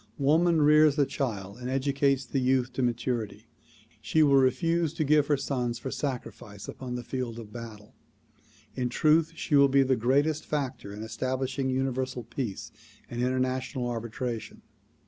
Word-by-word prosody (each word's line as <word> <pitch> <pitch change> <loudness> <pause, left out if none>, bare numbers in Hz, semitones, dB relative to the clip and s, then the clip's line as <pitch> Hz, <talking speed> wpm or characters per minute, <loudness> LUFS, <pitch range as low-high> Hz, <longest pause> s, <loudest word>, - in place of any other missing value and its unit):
Woman 160 +3 +3
rears 150 0 +6
the 145 -2 +3
child 105 -7 -4
and 125 0 -5
educates 135 0 +1
the 135 - -1
youth 130 -1 +1
to 130 - -2
maturity. 120 -2 -2 0.6
She 160 - +3
will 140 -2 +5
refuse 155 +5 +2
to 160 - 0
give 150 0 +3
her 145 - +2
sons 125 -3 -2
for 130 +2 -6
sacrifice 115 -7 -5
upon 125 -2 -6
the 125 - -5
field 120 -2 -4
of 110 -3 -10
battle. 110 -3 -9 0.8
In 125 -1 -2
truth 160 +5 +3
she 160 - -4
will 140 -1 +6
be 135 0 +5
the 130 0 +2
greatest 140 +6 +1
factor 130 -8 -3
in 105 +2 -7
establishing 130 +4 -2
Universal 130 -1 -2
Peace 115 -3 -5 0.4
and 120 0 -3
international 130 0 -1
arbitration. 115 0 -5
130 Hz, 155 wpm, -28 LUFS, 120-140 Hz, 0.8 s, rears